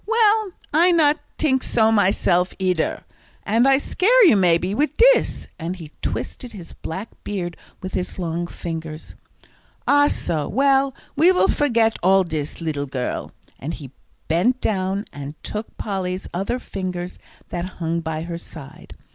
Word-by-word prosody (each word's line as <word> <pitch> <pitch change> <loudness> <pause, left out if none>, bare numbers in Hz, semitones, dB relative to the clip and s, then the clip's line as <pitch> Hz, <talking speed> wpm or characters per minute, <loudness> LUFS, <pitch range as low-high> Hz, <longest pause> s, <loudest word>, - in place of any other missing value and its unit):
"Well, 435 -3 +3 0.2
I 340 +4 +5
not 310 -3 +4 0.2
tink 265 -4 +2
so 220 -3 +2
myself, 185 -3 +2
eeder. 180 -4 0 0.4
And 230 +5 +3
I 270 0 +6
scare 435 - +4
you 320 - +7
maybe, 180 0 +3
wid 295 +7 0
dis," - - +4
and 170 +2 -3
he 160 -5 -10
twisted 250 -3 -4
his 180 -5 -10
black 190 +7 -6
beard 175 -4 -3 0.3
with 185 - -5
his 180 - -3
long 170 -1 -2
fingers. 160 -2 -6 0.7
"Ah, 290 0 +5
so; 155 - -2
well, 270 +1 +3 0.2
we 330 +6 +6
will 370 - +3
forget 230 -6 +2
all 190 +1 +5
dis, 155 -2 -4
leedle 145 -3 -2
girl," 130 -2 -3 0.3
and 150 +6 -4
he 140 -5 -10 0.4
bent 225 +11 +2
down 195 -2 -1
and 145 +1 -7
took 215 +1 -6
Polly's 190 -3 -3
other 195 +7 -1
fingers 185 -6 -5 0.3
that 175 0 -3
hung 165 0 -1
by 160 -1 -3
her 170 0 -5
side. 140 -5 -11
190 Hz, 150 wpm, -22 LUFS, 170-265 Hz, 0.7 s, you